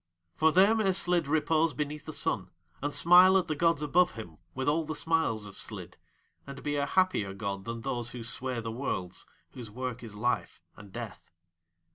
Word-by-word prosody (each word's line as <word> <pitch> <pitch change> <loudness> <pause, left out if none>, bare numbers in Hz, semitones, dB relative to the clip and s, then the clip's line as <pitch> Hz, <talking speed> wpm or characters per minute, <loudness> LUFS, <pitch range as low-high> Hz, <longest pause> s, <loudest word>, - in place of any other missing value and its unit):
For 160 0 +4
there 195 +6 +5
may 215 -4 +2
Slid 175 -4 +1
repose 160 +1 +2
beneath 150 0 -4
the 155 - -6
sun - - -1 0.3
and 145 +1 -1
smile 180 +4 +7
at 185 - 0
the 155 - 0
gods 165 -1 +2
above 175 +5 +3
him 105 -9 -10 0.2
with 130 0 -3
all 160 +3 +2
the 155 0 -5
smiles 160 -10 0
of 100 -2 -8
Slid, - - -7 0.5
and 140 0 -9
be 145 0 -1
a 140 0 0
happier 160 - +1
god 100 -1 -4
than 115 0 -5
Those 120 0 -2
who 120 -1 -7
sway 125 +1 -3
the 115 0 -5
Worlds, 95 -7 -4 0.2
whose 120 -4 -9
work 125 +2 -5
is 110 -3 -9
Life 120 +4 -1 0.2
and 100 -1 -13
Death. 115 -2 -8
140 Hz, 190 wpm, -29 LUFS, 115-165 Hz, 0.5 s, smile